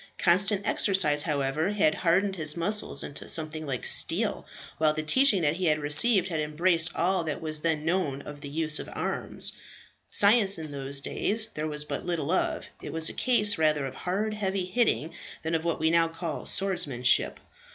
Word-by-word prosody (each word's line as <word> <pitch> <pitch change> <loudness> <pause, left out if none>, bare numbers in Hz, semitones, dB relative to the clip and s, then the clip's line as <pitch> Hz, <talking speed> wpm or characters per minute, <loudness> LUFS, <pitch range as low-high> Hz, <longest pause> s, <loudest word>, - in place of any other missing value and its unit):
Constant 195 +3 +3
exercise, 190 -9 +3
however, 145 +3 -1
had 175 -7 +2
hardened 190 +4 +1
his 155 -2 -1
muscles 205 +5 +1
into 140 - -8
something 155 -1 0
like 130 -4 -4
steel, - - +1 0.3
while 155 -1 +3
the 155 0 -4
teaching 210 - +3
that 150 +2 +1
he 185 - -2
had 155 -2 +2
received 175 +7 +4
had 160 -3 -3
embraced 165 +2 0
all 180 +1 0
that 155 -3 -4
was 155 -1 -1
then 155 -2 -1
known 165 -6 -1
of 145 -1 -10
the 145 - -7
use 155 0 0
of - - -8
arms. - - -2 0.5
Science 200 -2 +4
in 155 -2 -7
those 140 0 -3
days 220 +8 -2
there 155 +1 -4
was 150 -1 -4
but - - -5
little 170 -3 -2
of; 185 - -1 0.2
it - - -7
was 160 0 +3
a - - -7
case 210 -7 +2
rather 150 -3 +2
of 135 - -6
hard, 205 +4 -3
heavy 195 -3 -2
hitting, 185 -6 0 0.3
than 160 +1 -3
of 160 -1 0
what 170 -1 -2
we 160 +1 +1
now 165 0 +3
call 165 -1 -6
swordsmanship. 175 -11 0
165 Hz, 185 wpm, -27 LUFS, 150-190 Hz, 0.5 s, received